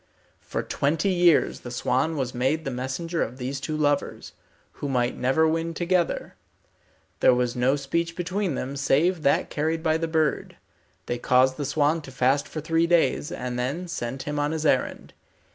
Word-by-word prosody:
For - - -4
twenty 155 +7 0
years 175 -3 +3
the 120 - -8
swan 130 +6 0
was 130 -3 -2
made 135 +6 0
the 135 - -2
messenger 135 +7 -3
of 125 +3 -3
these 135 +2 -4
two 155 +2 -3
lovers, 145 -1 -1 0.4
who 145 - -5
might 125 -2 0
never 135 +6 +2
win 165 +1 -1
together. 175 0 0 0.9
There 125 - +5
was 125 -1 0
no 125 +3 +2
speech 170 +4 -2
between 180 -1 -2
them, 135 +2 -4
save 155 +6 +2
that 140 - +1
carried 160 +2 -1
by 160 -1 +2
the 165 0 -2
bird. 160 -2 0 0.5
They 120 - -3
caused 130 +1 +3
the 145 - -3
swan 150 +3 +1
to 135 - -11
fast 130 +2 +1
for 155 - -6
three 165 +2 +1
days, 170 -3 +2
and 125 0 -4
then 145 +9 -2
sent 130 -5 -4
him 150 0 -3
on 145 +2 0
his 160 -1 -3
errand. - - 0
145 Hz, 180 wpm, -25 LUFS, 130-165 Hz, 0.9 s, There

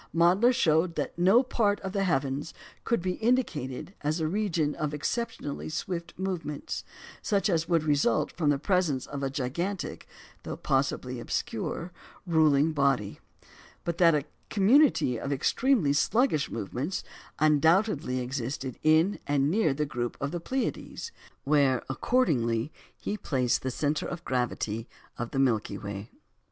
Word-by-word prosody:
Mädler 180 +8 +5
showed 165 -5 +2
that - - -3
no 190 +9 +5
part 210 -5 +1
of 190 - -4
the 195 - +1
heavens 140 -2 -1 0.3
could 235 -7 +1
be 185 -1 -1
indicated 190 - 0
as 150 +3 0
a 160 - 0
region 170 -5 0
of 150 -1 -3
exceptionally 150 -3 -3
swift 170 +1 -4
movements, 170 -6 -4 0.4
such 200 -3 +1
as 165 -1 0
would 165 -3 +3
result 145 -7 +2
from 155 -4 0
the 145 - +3
presence 160 -5 +1
of 140 -1 -6
a 135 - 0
gigantic 160 +8 -3 0.3
(though - - -6
possibly 135 -2 -1
obscure) 180 - -3 0.3
ruling 160 -3 +4
body; 135 -8 +1 0.6
but 170 -1 -3
that 170 -3 +6
a 145 -1 0 0.2
community 210 - +4
of 140 - -4
extremely 175 - +2
sluggish 185 - +2
movements 125 - -3 0.3
undoubtedly 155 - +3
existed 130 0 -4
in 160 +6 +3
and 145 0 +2
near 205 -5 +2
the 150 +3 -1
group 120 -3 -3
of 140 +1 -2
the 175 - -3
Pleiades, 265 - -3 0.3
where, 140 -3 +3
accordingly, 135 - +1 0.3
he 210 - -3
placed 130 - 0
the 130 - -2
centre 145 +4 -1
of 175 -1 -6
gravity 120 -3 -2 0.3
of 120 0 -3
the - - -5
Milky 125 -6 +1
Way. 100 +1 -6
155 Hz, 145 wpm, -28 LUFS, 135-185 Hz, 0.6 s, that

